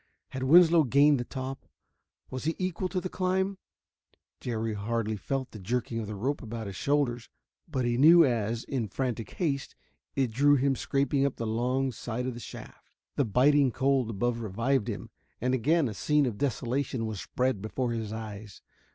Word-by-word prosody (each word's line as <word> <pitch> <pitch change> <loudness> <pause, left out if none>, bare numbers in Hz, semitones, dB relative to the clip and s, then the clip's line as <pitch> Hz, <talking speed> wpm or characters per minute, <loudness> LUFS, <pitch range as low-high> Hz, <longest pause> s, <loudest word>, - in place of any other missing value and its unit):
Had 130 - -6
Winslow 165 +4 +6
gained 140 +2 +4
the - - -1
top? 130 +1 -6 0.6
Was 130 +2 -5
he 160 - 0
equal 185 0 -2
to 185 +1 -1
the 185 - -4
climb? 190 +1 -1 0.8
Jerry 115 -2 -2
hardly 110 +1 -2
felt 130 +6 -3
the 110 - -9
jerking 115 +3 -2
of 110 - -4
the 105 - -5
rope 135 +9 -2
about 115 -2 -6
his 100 -1 -6
shoulders, 130 -2 0 0.4
but 130 -5 -1
he 120 0 0
knew 165 +3 +8
as, 115 -2 -1
in 125 -5 -2
frantic 120 +1 -3
haste, 140 -7 -2 0.4
it 130 -4 +1
drew 145 +5 +4
him 135 0 +2
scraping 140 +1 0
up 140 -1 0
the 115 - -4
long 125 +4 0
side 120 0 -4
of 130 - -2
the 120 - -8
shaft. 115 - -11 0.3
The 140 - +2
biting 135 +5 +4
cold 130 -1 +1
above 115 +3 -1
revived 115 +3 0
him, - - -5 0.3
and 125 +2 0
again 145 +5 +2
a 110 - -4
scene 150 +7 +2
of 115 -5 -3
desolation 130 -2 -1
was 110 -3 -4
spread 125 -5 -1
before 120 +3 -2
his 110 -2 -3
eyes. 110 -3 -8
125 Hz, 180 wpm, -28 LUFS, 115-140 Hz, 0.8 s, knew